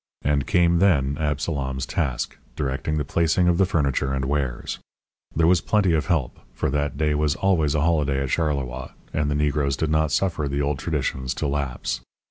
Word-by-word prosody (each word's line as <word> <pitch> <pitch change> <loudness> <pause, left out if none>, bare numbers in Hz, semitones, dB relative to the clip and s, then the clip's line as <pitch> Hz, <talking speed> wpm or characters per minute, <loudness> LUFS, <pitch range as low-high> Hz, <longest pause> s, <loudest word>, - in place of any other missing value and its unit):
And 70 -1 +1
came 85 -2 +3
then 70 -8 +3
Absalom's 70 -3 -1
task, 70 -6 -2 0.2
directing 70 +2 -2
the 75 - -1
placing 85 +4 +2
of 85 0 +3
the 95 - +4
furniture 70 -5 0
and 65 0 -1
wares. 65 -3 -2 0.6
There 80 - +3
was 90 0 +4
plenty 100 -4 +2
of 80 +1 0
help, 80 -8 0 0.2
for - - -1
that 75 0 -1
day 75 0 +1
was 75 0 +1
always 80 -7 +2
a 75 - +2
holiday 75 -4 +1
at 65 - -3
Charleroi, 70 -5 -2 0.2
and 75 -1 0
the 75 - 0
Negroes 70 -2 +1
did 80 -1 -1
not 80 -1 +2
suffer 80 -3 0
the 70 +1 -2
old 70 -1 0
traditions 65 -5 -2
to - - -2
lapse. 70 -3 -2
75 Hz, 185 wpm, -24 LUFS, 70-80 Hz, 0.6 s, the